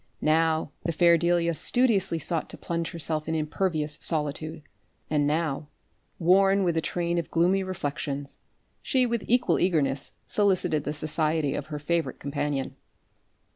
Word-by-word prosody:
Now 160 -1 +2
the 170 - 0
fair 170 +1 +5
Delia 170 0 +2
studiously 195 - +1
sought 165 +1 -2
to - - -7
plunge 170 -1 -3
herself 155 -2 -3
in 160 - -1
impervious 155 -1 -1
solitude; 155 0 -2 0.5
and 145 -1 +2
now, 150 -1 -1 0.5
worn 195 +3 +4
with 170 -2 +1
a 160 - +2
train 170 +1 -1
of 170 - -5
gloomy 180 +3 +2
reflections, 145 -5 -4 0.4
she 260 -1 +2
with 235 -3 -1
equal 245 +1 +3
eagerness 145 -7 0
solicited 185 -7 +1
the 150 - -2
society 155 -1 0
of 140 - -4
her 150 -1 -5
favourite 165 +3 -1
companion. 140 -1 -3
165 Hz, 140 wpm, -27 LUFS, 150-175 Hz, 0.5 s, fair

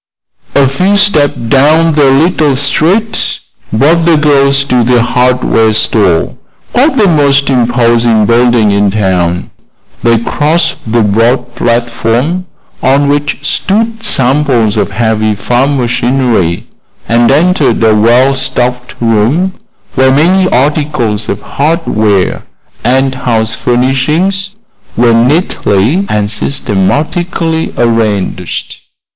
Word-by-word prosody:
A 140 -1 +4
few 185 +10 0
steps 155 -8 +2
down 145 +7 +2
the 145 -2 +3
little 150 0 +1
street 165 +11 0 0.3
brought 155 +9 +2
the 165 -1 +3
girls 140 -2 +2
to 125 -3 0
the 120 0 +2
hardware 125 -3 +1
store, 100 -6 +1 0.4
quite 270 +3 +2
the 210 - +3
most 140 -4 +2
imposing 120 -3 +1
building 120 -2 +2
in 100 0 +1
town. 90 -4 -1 0.5
They 115 -1 +2
crossed 155 +8 -1
the 115 -1 +2
broad 120 +4 0
platform 120 +8 -1 0.3
on 140 +2 +2
which 145 0 -2
stood 225 +6 -2
samples 130 - +1
of 105 - -1
heavy 110 0 -1
farm 125 +7 0
machinery 120 -7 -1 0.4
and 120 +1 +2
entered 150 -5 +1
a 110 -1 +4
well 120 +5 +3
stocked 125 -2 -3
room 120 - 0 0.4
where 130 -1 +2
many 185 +7 +2
articles 130 -6 -1
of - - -3
hardware 110 - -1 0.4
and 130 +2 +1
house 115 -4 -1
furnishings 150 +12 -1 0.4
were 120 0 +3
neatly 130 - 0
and 105 0 -1
systematically 155 - -2
arranged. 115 -4 -2
130 Hz, 110 wpm, -9 LUFS, 115-150 Hz, 0.5 s, A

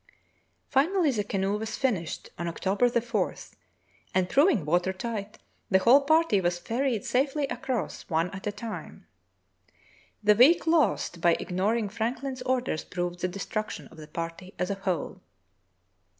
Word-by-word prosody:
" - - -41 0.3
Finally 315 +3 +3
the 210 -5 -1
canoe 200 0 -1
was 220 0 -4
finished 200 - -2
on 170 - -2
October 195 +7 +1
4, 235 -4 0 0.8
and, 185 -1 +2
proving 275 - +4
water 175 +4 +2
tight, 215 +1 -5 0.3
the 190 - +5
whole 240 +9 +6
party 315 -8 +3
was 175 0 0
ferried 230 +3 -1
safely 275 +3 +1
across, 255 -3 -3
one 165 +2 +1
at 195 +1 -7
a - - 0
time. 215 +2 -8 1.2
The 210 0 +6
week 260 +12 +6
lost 315 - +2
by 170 -1 +5
ignoring 205 +5 0
Franklin's 245 +5 -3
orders 250 -10 -1
proved 175 0 -4
the 185 - 0
destruction 205 +3 -4
of - - -16
the 155 -1 -10
party 165 +4 -6
as 180 +2 -1
a 195 -1 -5
whole. 180 - -3
210 Hz, 150 wpm, -27 LUFS, 185-255 Hz, 1.2 s, whole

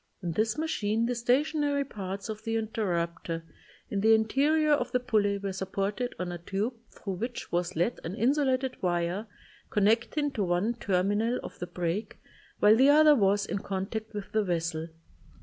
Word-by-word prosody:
In 175 - -1
this 215 - 0
machine 230 -8 0
the 245 - 0
stationary 285 +4 +1
parts 195 -5 -6
of 215 -1 -5
the 225 0 -2
interrupter 170 -7 -2 0.5
in 200 - 0
the 220 +1 +6
interior 290 +8 +2
of 295 - +2
the 250 - +2
pulley 215 -5 +1
were 200 -1 -4
supported 195 +5 -2
on 180 -1 -3
a 175 - -6
tube 200 +8 -2 0.2
thru 195 - -6
which 235 +6 -5
was 175 +1 -1
led 175 +9 0
an 170 +4 -4
insulated 260 +1 +1
wire 175 +4 -1 0.4
connect 225 +7 +2
ing 290 -1 +1
to 215 - -1
one 180 +6 +1
terminal 205 +3 0
of - - -9
the 175 - -4
break 175 +4 -3 0.4
while 210 +1 +6
the 265 +4 +5
other 305 +1 +7
was 200 -3 +2
in 200 - -3
contact 200 +3 -4
with 205 -1 -6
the 215 -1 +2
vessel. 165 -3 -2
210 Hz, 170 wpm, -29 LUFS, 185-245 Hz, 0.5 s, other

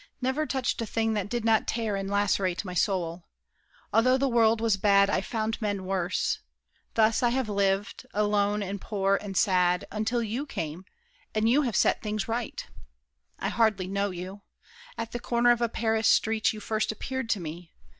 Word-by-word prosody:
Never 265 +4 -1
touched 260 -3 -1
a 230 - -3
thing 225 0 0
That 205 -2 -2
did 235 -1 -2
not 225 -1 +3
tear 225 -3 -1
and 195 0 -3
lacerate 200 -2 0
my 180 - -5
soul! 175 -2 -1 0.7
Although 255 +4 +4
the 275 +1 +1
world 230 -2 +3
was 225 -2 +2
bad, 200 0 +4
I 190 - +1
found 220 +2 -3
men 200 -3 -2
worse. 185 -1 -1 0.6
Thus 220 0 +3
I 240 - +3
have 255 0 0
lived; 200 -1 -1
alone 205 0 +1
and 200 0 -5
poor 195 -2 +1
and 195 -2 -5
sad, 180 -3 +3
Until 225 +3 -1
you 235 +7 -3
came, 165 - -5 0.5
and 215 +1 +2
you 260 +6 +4
have 240 -8 -1
set - - +3
things 215 -1 -3
right. 230 0 -3 0.7
I - - -2
hardly 220 -5 +2
know 200 +1 -1
you. 185 +2 -7 0.6
At 230 0 -4
the 240 - -4
corner 240 0 +3
of 240 0 +1
A 235 - +2
Paris 225 -1 0
street 220 -1 +3
you 215 - -7
first 215 0 -1
appeared 260 +2 -4
to 215 - +1
me. 170 +1 -8
215 Hz, 185 wpm, -27 LUFS, 195-230 Hz, 0.7 s, Although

